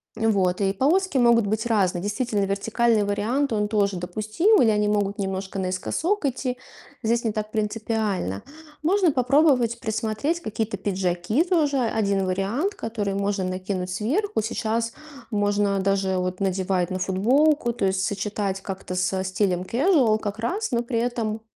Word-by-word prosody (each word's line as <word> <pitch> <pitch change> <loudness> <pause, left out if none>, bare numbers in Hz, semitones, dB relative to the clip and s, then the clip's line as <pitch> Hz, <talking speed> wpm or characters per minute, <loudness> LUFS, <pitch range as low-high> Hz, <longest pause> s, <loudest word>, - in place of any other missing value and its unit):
Вот. 200 -5 +1
И 195 0 +2
полоски 310 - +1
могут 235 -3 +4
быть 220 +2 -1
разные. 190 -6 +1
Действительно, 210 0 -1
вертикальный 215 +3 +1
вариант, 230 +7 0
он 210 -1 +1
тоже 200 -3 +1
допустим, 215 - +2
или 230 - +5
они 210 -1 +2
могут 205 -1 0
немножко 195 0 -3
наискосок 285 - -1
идти. 255 -1 -2 0.5
Здесь 235 +2 +1
не 225 - 0
так 215 0 -4
принципиально. 210 - -2 0.4
Можно 365 +1 +3
попробовать 255 -3 +3
присмотреть 220 +8 -1
какие-то 220 -7 -3
пиджаки. 185 - 0
Тоже 320 -6 +1 0.2
1 200 -2 +1
вариант, 215 - -1
который 215 - -3
можно 200 0 -1
накинуть 185 0 -3
сверху. 280 - -1
Сейчас 230 +1 -1 0.4
можно 205 -1 +1
даже 195 -1 +1
вот 185 0 -2
надевать 185 -1 0
на 185 - -2
футболку. 240 +8 +2
То 215 -4 -1
есть 190 0 +1
сочетать 200 -1 -2
как-то 190 -1 -6
со 185 +1 0
стилем 185 -1 0
casual 245 - +3
как 205 -1 -4
раз, 390 - -2
но 235 -1 +1
при 235 -1 -1
этом 230 -2 -2
210 Hz, 150 wpm, -24 LUFS, 195-240 Hz, 0.5 s, или